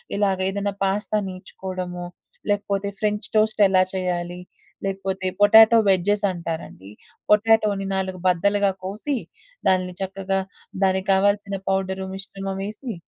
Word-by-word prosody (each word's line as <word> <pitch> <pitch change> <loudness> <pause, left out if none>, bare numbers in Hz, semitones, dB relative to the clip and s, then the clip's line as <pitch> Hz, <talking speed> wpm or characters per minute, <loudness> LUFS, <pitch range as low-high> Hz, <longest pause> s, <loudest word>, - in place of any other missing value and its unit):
ఇలాగేదైనా 200 0 0
pasta 205 +2 0
నేర్చుకోవడమొ, 185 -1 -6 0.4
లేకపోతే 200 -1 0
French 210 -1 -1
toast 215 0 +2
ఎలా 185 -1 +4
చేయాలి, 180 -1 -2 0.5
లేకపోతే 190 -1 -2
పొటాటో 220 +2 +8
వెడ్జెసంటారండి. 180 - -1 0.4
పొటాటోని 210 -2 +3
4 190 -1 -3
బద్దలుగా 200 +3 +2
కోసి 215 +9 -2 0.5
దాని 185 -1 +1
చక్కగా 195 0 -2 0.4
దానికి 190 0 +1
కావాల్సిన 200 +1 +1
పౌడర్ 190 0 -1
మిశ్రమం 195 0 -5
ఎసి 225 +3 -6
195 Hz, 100 wpm, -23 LUFS, 185-205 Hz, 0.5 s, పొటాటో